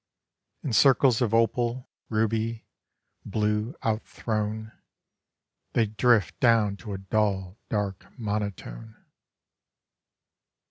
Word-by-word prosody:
In 130 - -2
circles 130 0 +5
of 120 -4 +2
opal, 120 +2 +1 0.2
ruby, 110 +1 0 0.6
blue, 105 - -1
out 110 0 +1
thrown, 110 0 -3 1.0
They 115 - +3
drift 110 -1 +2
down 115 -5 +3
to 105 -1 -7
a - - -3
dull, 95 -1 -1
dark 100 -3 -2
monotone. 105 - -4
110 Hz, 90 wpm, -27 LUFS, 105-115 Hz, 1.0 s, circles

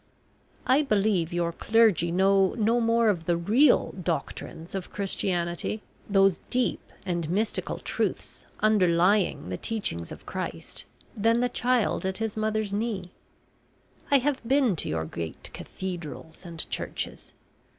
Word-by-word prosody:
I 265 +3 +5
believe 205 - +1
your 170 -1 0
clergy 210 -3 +3
know 190 +1 +3
no 230 +2 +3
more 230 0 +3
of 175 -6 +1
the 170 0 +2
real 235 - +4
doctrines 165 -1 -4
of 190 -2 -4
Christianity, 185 0 -2 0.3
those 195 -2 +4
deep 250 0 0 0.2
and 170 -4 -2
mystical 210 +5 0
truths - - -3
underlying 190 - +3
the 90 - -3
teachings 140 - -3
of - - -10
Christ, - - -5 0.3
than 225 +2 +3
the 245 0 +2
child 245 -3 +1
at 190 0 -2
his 225 -2 -3
mother's 215 -1 -1
knee. 205 -4 -2 1.0
I 280 - +6
have 275 +1 0
been 255 -4 +3
to - - -3
your 80 0 -1
great 80 0 -6
cathedrals 175 -2 -7
and 165 -2 -5
churches. - - -4
195 Hz, 130 wpm, -27 LUFS, 170-225 Hz, 1.0 s, I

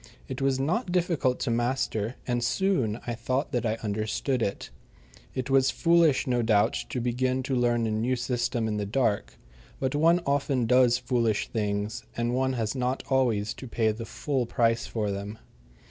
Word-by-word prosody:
It - - -5
was 135 -1 +1
not 175 - 0
difficult 170 -8 +1
to 125 - 0
master, 120 -1 -1
and 120 -1 -1
soon 120 - +1
I 120 - -2
thought 130 +5 -2
that 120 -4 0
I 110 - 0
understood 110 +5 -1
it. 100 - -3 0.6
It 130 +1 -3
was 135 0 +4
foolish, 165 -5 +3
no 125 -2 +1
doubt, 110 -3 +3 0.2
to - - -2
begin 130 +2 0
to 135 0 -1
learn 120 -1 +2
a 110 - -1
new 115 +4 0
system 120 -1 -1
in 105 -1 -1
the 105 - -2
dark, 105 - 0 0.4
but 130 -1 -1
one 165 +4 +4
often 140 -3 +1
does 125 0 +4
foolish 120 -4 0
things, 105 0 -2
and 120 +1 0
one 130 +1 +1
has 115 -4 -1
not 130 0 -1
always 115 -6 +2
to 130 - -9
pay 115 -2 +1
the 115 +1 -7
full 135 -2 -2
price 115 -1 +1
for 105 -3 -2
them. 100 +2 -5
120 Hz, 175 wpm, -27 LUFS, 110-130 Hz, 0.6 s, was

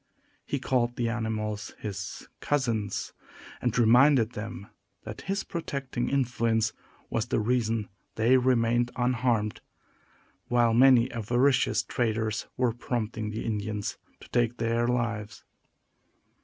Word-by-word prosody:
He 140 - -1
called 120 -2 0
the 120 -1 0
animals 110 -2 -3
his 105 -4 -6
cousins, 115 -8 -1 0.5
and 120 -2 0
reminded 120 +1 +5
them 115 -1 -6 0.4
that - - -7
his 195 0 0
protecting 140 -7 -3
influence 115 -4 +1 0.4
was 115 +1 -1
the - - +1
reason 115 -2 0 0.3
they 115 +4 +4
remained 120 -1 +2
unharmed, 120 -3 0 0.9
while 120 -2 +3
many 125 0 +6
avaricious 120 +4 +2
traders 110 -2 -1
were 125 -3 +2
prompting 110 -2 -3
the 110 +1 -4
Indians 105 -1 -3 0.2
to - - -14
take 120 -1 +1
their 115 +1 +1
lives. 115 -4 -2
115 Hz, 115 wpm, -28 LUFS, 110-125 Hz, 0.9 s, many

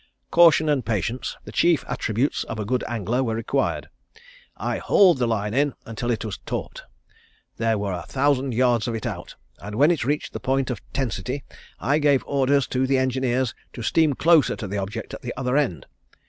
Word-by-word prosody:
Caution 165 -2 +6
and 145 -4 +2
patience, 115 +3 -2
the - - -10
chief 170 -4 +2
attributes 125 +1 -1
of - - -6
a 105 - -3
good 125 +4 0
angler 120 +2 -1
were 115 -3 -1
required. 115 +5 -1 0.7
I - - -2
hauled 180 -8 +5
the 120 - +2
line 105 -2 -1
in 140 +1 +1
until 115 +2 -4
it 115 -2 -1
was 105 -4 -5
taut. - - -5 0.8
There 115 -1 +1
were 100 -1 -2
a 85 -2 -6
thousand 135 -2 +1
yards 120 -2 +2
of 115 - -2
it 110 - -5
out, - - -5 0.2
and 105 0 -7
when 145 +8 +5
it 165 -7 0
reached 145 +4 -2
the - - -4
point 135 0 0
of 125 - -5
tensity, 130 +1 -3 0.4
I 145 +4 +1
gave 145 -3 +3
orders 140 -1 +2
to 130 +1 0
the 135 0 +2
engineers 130 -1 0 0.2
to 120 - -7
steam 155 +5 +3
closer 160 +1 +4
to 105 - -6
the 100 +1 -3
object 105 +3 -5
at - - -7
the 120 - -5
other 125 0 -1
end. 120 - 0
125 Hz, 195 wpm, -24 LUFS, 115-140 Hz, 0.8 s, Caution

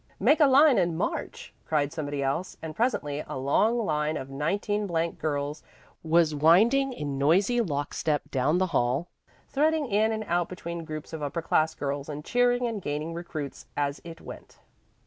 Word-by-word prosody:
"Make 275 - +4
a 295 - +7
line 275 -2 +6
and 170 -3 0
march," - - -4
cried 150 -1 0
somebody 145 -3 -3
else, 140 +7 -2
and 160 -1 -7
presently 150 - -1
a - - -5
long 175 - +2
line 150 -1 0
of 135 +1 -7
19 205 +8 -1
girls 155 -3 -2 0.4
was 160 -1 +3
winding 215 - +4
in 145 - -4
noisy 195 - +3
lock 145 -8 -2
step 150 -2 0
down 140 +5 +2
the 185 - +2
hall, 130 +6 +1 0.4
threading 310 +2 +2
in 220 -1 +2
and 220 0 -2
out 175 -3 0
between 170 -2 -6
groups 155 0 -7
of 160 - -5
upper 145 +3 -3
class 155 0 +1
girls 140 0 -3
and 150 0 -6
cheering 245 0 +2
and 225 -4 -3
gaining 150 +1 -3
recruits 160 -4 -6
as 145 0 -1
it 165 -1 -10
went. - - -11
165 Hz, 170 wpm, -27 LUFS, 145-205 Hz, 0.4 s, a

